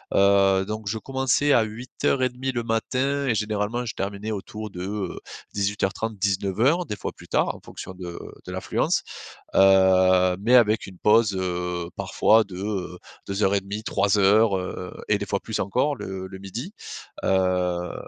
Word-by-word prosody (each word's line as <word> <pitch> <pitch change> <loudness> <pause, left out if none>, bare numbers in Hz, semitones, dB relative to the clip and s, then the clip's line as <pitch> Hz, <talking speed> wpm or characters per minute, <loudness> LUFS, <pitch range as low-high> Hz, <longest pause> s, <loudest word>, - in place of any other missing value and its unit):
Heu, 100 -1 +4
donc, 110 -1 -5
je 110 - -1
commençais 135 +3 +1
à 120 - +5
8:30 125 +3 -2
le 120 -2 -2
matin 130 +5 -1
et 120 - +2
généralement, 105 +3 -1
je 115 - -4
terminais 100 +2 -4
autour 105 +1 -6
de, 90 - -7
heu, 100 -2 -4 0.3
18:30-19:00 100 - 0
des 105 - -3
fois, 100 - -5
plus - - -16
tard, - - +1
en - - -12
fonction 95 - -9
de 90 -2 -7 0.3
de - - -7
l'affluence, - - 0 0.5
heu, 95 -1 +5
mais, 120 +4 +3
avec 110 -3 +4
une 95 -2 -12
pause, 105 0 +4
heu, 90 -2 -2
parfois 110 +1 +3
de, 95 -3 -10
heu, 95 -3 -4 0.3
2 100 +2 -2
heures 95 0 +3
et 100 - +2
demi, 100 +2 -5
3 100 +1 +1
heures, 100 +1 +4
heu 90 0 -6 0.2
et 105 - +3
des 100 - -3
fois, 100 - -1
plus 110 - -4
encore 130 +9 0
le 95 0 -6
le 95 0 -9
midi 115 - -7 0.5
heu 90 -2 +1
100 Hz, 165 wpm, -24 LUFS, 95-115 Hz, 0.5 s, à